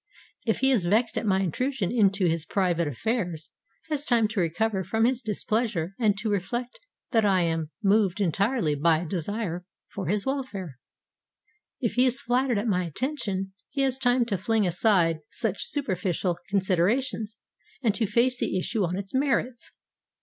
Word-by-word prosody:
If 220 - +1
he 265 0 +4
is 220 -9 +2
vexed 220 +5 +2
at 220 - -1
my 190 -1 +3
intrusion 220 - -1
into 200 -5 +3
his 165 -2 +1
private 175 -2 0
affairs, 170 - -2 0.4
he 315 - -3
has 290 -1 0
time 235 -6 +3
to 215 -2 -2
recover 190 +4 0
from 220 +5 +1
his 255 0 +1
displeasure 210 -5 -1
and 215 -4 +3
to 220 +2 -2
reflect 240 - -3 0.3
that 225 -4 +3
I 195 -3 +3
am 165 -2 -1
moved 200 -1 +3
entirely 200 - +1
by 160 +2 +3
a - - -5
desire 180 0 -3 0.3
for 190 -4 -4
his 200 +3 0
welfare. 205 - -4 1.0
If 235 - -1
he 250 +1 +4
is 255 +1 +2
flattered 245 -1 +1
at 205 - -1
my 185 -4 +2
attention, 195 - -3 0.2
he 275 - -2
has 265 -1 0
time 245 -1 +3
to 200 -5 -2
fling 220 +2 +1
aside 175 -3 +2
such 220 -5 -2
superficial 185 - -1
considerations 205 +4 0 0.4
and 220 -4 +3
to 220 0 0
face 245 +4 +2
the - - 0
issue 210 +3 -1
on 180 +1 -1
its 195 -1 -6
merits. 260 -3 0
205 Hz, 170 wpm, -26 LUFS, 180-240 Hz, 1.0 s, he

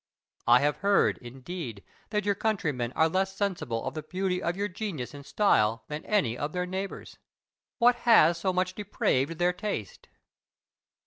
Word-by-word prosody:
I 120 +1 +7
have 145 +1 +1
heard, 200 0 +2
indeed, 125 - -7 0.3
that 210 -1 -1
your 205 - +3
countrymen 155 - -1
are 160 - +3
less 190 +3 -1
sensible 160 - -2
of - - -3
the 155 - -4
beauty 180 +3 -2
of 175 +2 -2
your 205 +1 0
genius 180 - -5
and 145 0 -9
style 120 - +2
than 150 +1 -5
any 145 - +1
of 145 +4 -4
their 180 0 -1
neighbours. 190 +2 -6 0.6
What 245 +1 +5
has 175 -9 +5
so 185 +2 +1
much 185 0 0
depraved 165 -7 0
their 175 +1 +2
taste? 180 - -5
180 Hz, 165 wpm, -28 LUFS, 140-200 Hz, 0.6 s, I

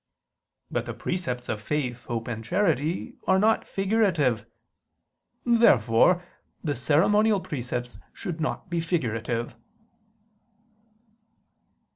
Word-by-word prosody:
But - - -2
the - - -5
precepts 145 -10 -3
of 105 -1 -3
faith, 125 -1 -2
hope, 115 -2 -3
and 115 -2 -4
charity 165 - 0
are 190 - +5
not 220 +3 +2
figurative. 185 - +1 1.0
Therefore 180 - +4 0.4
the 150 -4 0
ceremonial 195 - +3
precepts 125 -6 -5
should 170 -3 -5
not 155 - -2
be 170 -1 -1
figurative. 120 -8 -2
150 Hz, 95 wpm, -26 LUFS, 120-185 Hz, 1.0 s, are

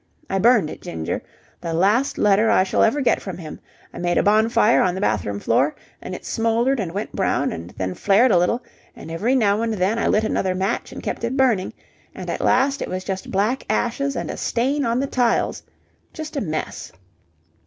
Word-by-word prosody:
I 195 - +1
burned 215 -6 +4
it, - - -10
Ginger. 80 +1 -4 0.4
The 165 -1 -3
last 210 +10 +2
letter 210 +2 +3
I - - +4
shall 190 - 0
ever 280 +6 +3
get 255 - +2
from 190 -4 -6
him. 160 -4 -8 0.3
I - - -8
made 175 0 0
a - - +3
bonfire 220 +2 +4
on 180 -1 +1
the - - -3
bathroom 105 -1 -1
floor, 135 +8 +1 0.3
and 185 - -6
it - - -10
smouldered 230 +4 +1
and 185 -5 -3
went 200 +4 -4
brown, 140 -8 0
and 85 +1 -7
then 95 -1 -2
flared 210 - +3
a 180 - +5
little, 230 +8 0 0.3
and 160 - -10
every 220 +11 0
now 210 -4 +2
and 230 -1 -1
then 200 +4 0
I - - +1
lit 215 - +2
another 190 -3 0
match 190 +2 -2
and - - -8
kept - - -4
it 240 +3 -1
burning, 240 -8 +2 0.4
and - - -5
at - - -3
last 275 +3 +2
it - - -3
was 185 0 -4
just 190 -1 -5
black 215 +7 0
ashes 275 +4 0
and - - -3
a - - -7
stain 270 +4 0
on 235 +1 +1
the - - 0
tiles. 245 -3 0 0.5
Just 310 -1 -7
a 280 - -1
mess! 155 -6 -4
210 Hz, 210 wpm, -22 LUFS, 180-240 Hz, 0.5 s, a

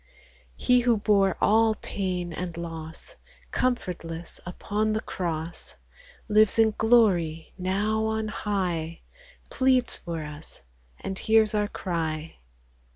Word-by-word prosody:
He 250 -1 +4
who 240 -2 +3
bore 200 -2 +3
all 220 +1 +4
pain 180 -4 -3
and 175 0 -5
loss, 165 -1 -7 0.3
Comfortless 175 -9 -2
upon 210 +4 -1
the 215 - +1
cross, 170 -4 -4 0.5
Lives 215 0 +4
in 220 -1 +5
glory 185 -9 +3
now 205 +4 0
on 220 0 -1
high, 180 -6 -2 0.5
Pleads 260 -2 +3
for 165 -2 -5
us, 150 - -8 0.4
and 190 0 -4
hears 220 -1 +4
our 210 -1 +1
cry. 165 -5 -3
195 Hz, 110 wpm, -26 LUFS, 170-220 Hz, 0.5 s, in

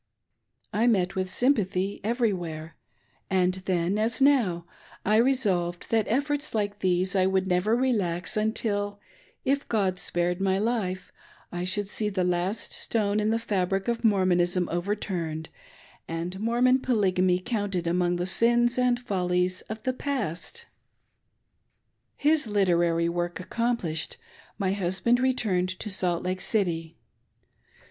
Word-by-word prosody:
I 225 +3 +2
met 190 -5 +2
with 185 0 -2
sympathy 200 -5 0
every 230 0 +1
where, 165 -3 -6 0.5
and 185 -1 +2
then, 185 +2 0
as 225 +3 +1
now, 235 -12 +3 0.4
I 215 +2 +4
resolved 200 -9 +1
that 225 -2 +2
efforts 285 +3 -1
like 205 -1 -1
these 185 +1 +1
I 185 -1 +3
wolild 190 0 +1
never 190 +4 +2
relax 205 -9 0
until, 205 -2 0 0.5
if 280 +1 0
God 190 -5 0
spared 175 0 -1
my 190 -1 +2
life, 200 -4 -2 0.4
I 175 0 -3
should 200 +2 -2
see 210 +1 -2
the 190 -3 -1
last 180 +4 -1
stone 210 -2 0
in 210 0 +1
the 225 - +2
fabric 195 -3 -1
of 235 0 -1
Mormonism 180 -4 +2
overturned 175 -4 -3 0.6
and 170 +3 -4
Mor 235 +3 0
mon 255 +1 +5
Polygamy 185 -7 +2
counted 200 -3 -2
among 175 +1 +1
the 175 0 -2
sins 240 +5 +3
and 250 -1 +2
follies 180 -4 -1
of 220 0 -6
the 255 - 0
past 275 - -3 1.5
His 300 -3 +2
literary 175 -5 +2
work 175 +1 -2
accomplished, 185 -5 -2 0.4
my 195 -2 0
husband 200 +5 +1
returned 220 -9 +1
to 210 - -3
Salt 175 -2 +1
Lake 185 0 -2
City. 170 -6 -1
195 Hz, 135 wpm, -27 LUFS, 180-230 Hz, 1.5 s, mon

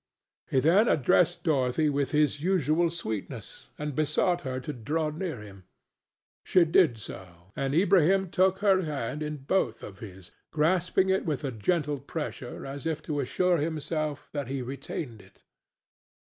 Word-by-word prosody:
He 130 - +3
then 180 - +4
addressed 170 - +3
Dorothy 145 -1 +2
with 140 -2 0
his 150 -2 +1
usual 170 -1 +2
sweetness 110 - -6
and 150 -1 -4
besought 155 +5 +1
her 130 -1 -3
to 140 +4 -5
draw 150 +6 -2
near 160 - -4
him; 100 -3 -13 0.8
she 180 -2 +4
did 160 -6 +4
so, 95 -3 -11
and 135 +1 -1
Ilbrahim 190 +1 +4
took 190 +1 +3
her 190 -2 +5
hand 150 -3 -3
in 150 0 -3
both 135 -4 -1
of 100 -1 -9
his, 95 -4 -10 0.2
grasping 180 +4 +2
it 190 0 +2
with 150 -3 -2
a 135 - -2
gentle 145 - 0
pressure, 140 -3 -6
as 140 +3 -5
if 160 -2 -2
to 150 -2 -2
assure 175 +7 +1
himself 155 -1 -2
that 145 -4 -3
he 135 0 -3
retained 130 -2 -6
it. - - -22
150 Hz, 155 wpm, -28 LUFS, 130-170 Hz, 0.8 s, her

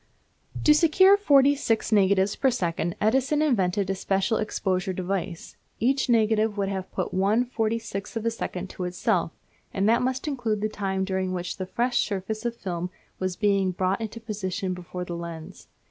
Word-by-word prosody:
To 300 - +7
secure 360 +5 +6
forty 285 -8 +5
six 230 -6 -1
negatives 200 -1 +3
per 270 - +2
second 175 -7 -1
Edison 265 +7 +2
invented 200 -8 +1
a 195 - 0
special 195 +3 0
exposure 190 -3 -1
device. 185 -1 -4 0.2
Each 265 +3 +1
negative 220 -2 +2
would 195 -1 0
have 190 -1 -3
but - - -2
one 205 +6 +2
forty 230 -2 -1
sixth 210 -1 -6
of 225 - -4
a 230 - +2
second 190 -4 -4
to 180 - -5
itself, 180 -1 0 0.4
and 195 +1 0
that 230 +2 +4
must 260 +3 -1
include 235 -7 -1
the 215 - 0
time 190 -2 -2
during 190 -1 -1
which 175 -1 -4
the 185 -1 -4
fresh 240 +5 +1
surface 210 +2 -4
of 235 0 -1
film 180 -5 -4 0.3
was 185 -1 -2
being 200 -2 +2
brought 185 +3 -1
into 225 +1 -5
position 200 -3 -3
before 180 0 -6
the 175 - -5
lens. 170 +1 -8
200 Hz, 175 wpm, -26 LUFS, 185-230 Hz, 0.4 s, To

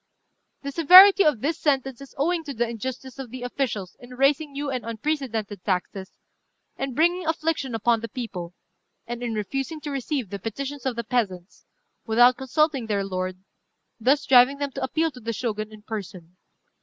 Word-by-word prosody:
"The 280 - -4
severity 370 +6 +9
of 290 -8 +2
this 310 +3 -1
sentence 270 -3 0
is 275 - -12
owing 330 +4 0
to 280 -2 -6
the 240 +1 0
injustice 260 +3 -6
of 265 -3 -6
the 250 +1 -8
officials 240 -7 -3
in 250 +1 -12
raising 280 +3 +2
new 280 0 -4
and 255 -3 -3
unprecedented 230 -4 -3
taxes, 190 0 -3 0.6
and 270 -2 -4
bringing 345 +2 +2
affliction 315 -6 -1
upon 230 +1 +2
the 230 +1 -6
people, 185 -8 -6 0.5
and 240 0 -6
in 235 -2 -3
refusing 270 +9 -3
to 295 - -5
receive 270 - -3
the 200 - -5
petitions 270 +6 -5
of 255 - -1
the 235 - -3
peasants, 205 -6 -3 0.4
without 240 +3 +5
consulting 270 -1 0
their 200 -2 0
lord, 185 -1 -4 0.6
thus 270 +6 +2
driving 255 +2 +6
them 285 -1 -3
to 270 - -6
appeal 320 +5 0
to 255 - -12
the 230 0 -4
Shogun 215 -2 -3
in 215 -1 -13
person. 185 -5 -7
250 Hz, 175 wpm, -24 LUFS, 220-280 Hz, 0.6 s, severity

